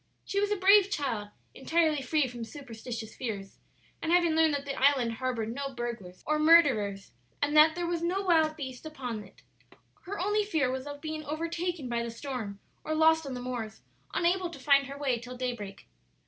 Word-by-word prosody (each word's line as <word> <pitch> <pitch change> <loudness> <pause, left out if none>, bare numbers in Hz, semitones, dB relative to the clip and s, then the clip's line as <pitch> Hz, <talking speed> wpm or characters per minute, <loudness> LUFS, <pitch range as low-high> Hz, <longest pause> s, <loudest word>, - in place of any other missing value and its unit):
She 395 - -1
was 410 0 +1
a 415 - +1
brave 395 +1 +6
child, 245 - -2 0.2
entirely 315 0 +1
free 285 +1 +1
from 240 -1 -7
superstitious 230 -3 -7
fears, 205 -6 -5 0.4
and 325 - -1
having 345 -1 +4
learned 320 -2 +4
that 280 0 -4
the 280 - -3
island 265 -4 +3
harbored 230 -2 -2
no 275 0 -5
burglars 235 -7 -6
or 305 0 +1
murderers, 260 -12 +4 0.3
and 290 +1 0
that 310 +1 +7
there 350 0 -2
was 340 -1 -1
no 365 +4 0
wild 320 -4 +3
beast 260 -5 -7
upon 250 -9 -5
it, 190 - -18 0.6
her 405 +2 -4
only 415 +3 +1
fear 315 -11 0
was 260 +2 -4
of 285 0 -7
being 310 -1 -4
overtaken 335 0 -3
by 235 -1 -1
the 235 - -3
storm 230 -4 -5 0.2
or 310 - -2
lost 320 -1 +4
on 265 - -4
the 245 - -5
moors, 240 -3 -5 0.3
unable 355 +1 +1
to 335 - -10
find 275 0 +4
her 280 +1 -7
way 265 -4 0
till 250 +2 -9
day 250 -1 -1
break. 200 -4 -9
280 Hz, 195 wpm, -29 LUFS, 240-320 Hz, 0.6 s, that